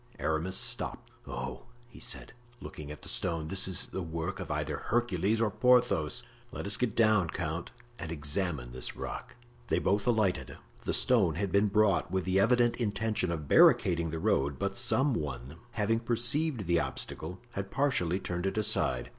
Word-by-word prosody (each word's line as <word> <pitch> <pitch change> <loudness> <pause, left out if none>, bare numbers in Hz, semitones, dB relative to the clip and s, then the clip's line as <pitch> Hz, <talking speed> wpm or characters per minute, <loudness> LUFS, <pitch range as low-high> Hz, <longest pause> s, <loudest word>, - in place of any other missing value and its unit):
Aramis 80 +4 0
stopped. - - -1 0.2
"Oh!" 65 0 -6 0.2
he 120 - -15
said, 120 - -4 0.3
looking 75 -9 -9
at 75 - -9
the - - -6
stone, 80 -2 +1
"this 95 +1 +6
is 95 - 0
the 95 - -4
work 85 +2 -4
of - - -6
either - - -2
Hercules 110 -3 0
or 115 -2 +1
Porthos. 120 - +2 0.3
Let - - -6
us 100 0 +2
get 115 -2 -1
down, 110 -6 +3
count, 80 0 -4 0.3
and 85 - -5
examine 75 -4 -2
this 65 0 -3
rock." - - -7 0.3
They - - +1
both 100 +3 0
alighted. 110 -6 0 0.3
The - - 0
stone 100 -11 +3
had 95 +2 -2
been 100 +2 +3
brought 100 -3 +2
with 95 0 -1
the 95 +1 +2
evident 120 +3 +3
intention 105 -4 -1
of 75 -4 -4
barricading 85 +2 +5
the 80 - -4
road, 70 -3 +1
but - - -2
some 135 +1 +2
one 70 - -5 0.2
having 115 +1 +1
perceived 120 +2 0
the 85 0 +2
obstacle 85 +3 -5
had 100 0 -5
partially 100 - 0
turned 90 0 -3
it 95 - -3
aside. 105 - 0
95 Hz, 170 wpm, -30 LUFS, 80-110 Hz, 0.3 s, this